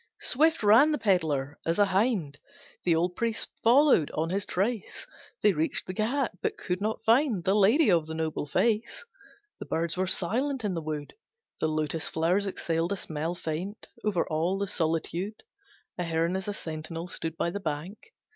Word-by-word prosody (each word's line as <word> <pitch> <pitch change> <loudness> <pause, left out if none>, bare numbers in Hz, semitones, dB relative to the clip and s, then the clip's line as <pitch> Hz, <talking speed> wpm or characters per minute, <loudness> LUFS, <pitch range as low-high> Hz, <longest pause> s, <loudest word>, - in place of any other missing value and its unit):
Swift 315 +1 +2
ran 230 +9 +6
the 300 - +1
pedlar 155 - 0
as 165 +1 0
a 205 - +5
hind, 190 - 0 0.5
The 170 -2 +4
old 175 +2 0
priest 230 +1 -1
followed 245 - +5
on 165 +2 -1
his 195 +1 0
trace, 210 +3 -2 0.4
They 210 - +5
reached 160 0 -1
the 185 - -5
Ghat 240 +7 0
but - - -2
could 180 +1 -3
not 215 +1 -2
find 230 - +3
The 190 - +2
lady 210 +6 +5
of 165 -3 +2
the 160 - -5
noble 160 -2 -2
face. 230 - 0 0.5
The - - -7
birds 165 +1 -1
were 185 0 0
silent 250 +9 +1
in 200 - 0
the 165 - -3
wood, 150 -2 -5 0.5
The 160 - +1
lotus 155 +1 -1
flowers 180 +5 +1
exhaled 165 -2 -1
a - - -1
smell 160 -1 -3
Faint, 175 +6 -5
over 205 -5 0
all 165 +4 0
the 200 - -1
solitude, 175 +5 -2 0.6
A - - 0
heron 165 +1 0
as 190 +1 -3
a 205 - -2
sentinel 160 0 -6
Stood 165 -2 -3
by 170 - 0
the 200 - -4
bank. 175 - -5
180 Hz, 180 wpm, -28 LUFS, 160-215 Hz, 0.6 s, ran